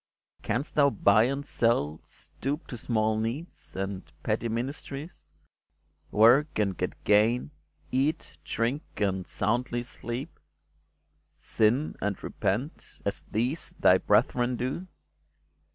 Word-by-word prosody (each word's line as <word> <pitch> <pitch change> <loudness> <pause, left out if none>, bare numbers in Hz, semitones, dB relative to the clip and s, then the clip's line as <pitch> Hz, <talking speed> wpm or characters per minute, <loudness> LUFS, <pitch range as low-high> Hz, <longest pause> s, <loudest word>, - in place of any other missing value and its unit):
Canst 120 +4 -2
thou 145 -1 +5
buy 115 -7 +4
and 140 +3 -2
sell, 80 - +1
Stoop 145 +5 -6
to 125 - -7
small 110 -2 0
needs, 120 +10 -5
and 95 0 -3 0.2
petty 115 - 0
ministries, 135 +6 -5 0.8
Work 125 +8 +5
and 100 -3 +1
get - - -4
gain, 110 +6 +3 0.4
eat, 140 +5 0
drink, 120 +6 -1 0.2
and 95 -3 0
soundly 120 +3 -1
sleep, 120 +4 -6 1.0
Sin 120 +8 +1
and 105 -2 -2
repent, 125 +11 -3
as - - -2
these 125 +9 -1
thy - - +6
brethren 125 0 +2
do 130 +10 -3
120 Hz, 110 wpm, -28 LUFS, 110-140 Hz, 1.0 s, thy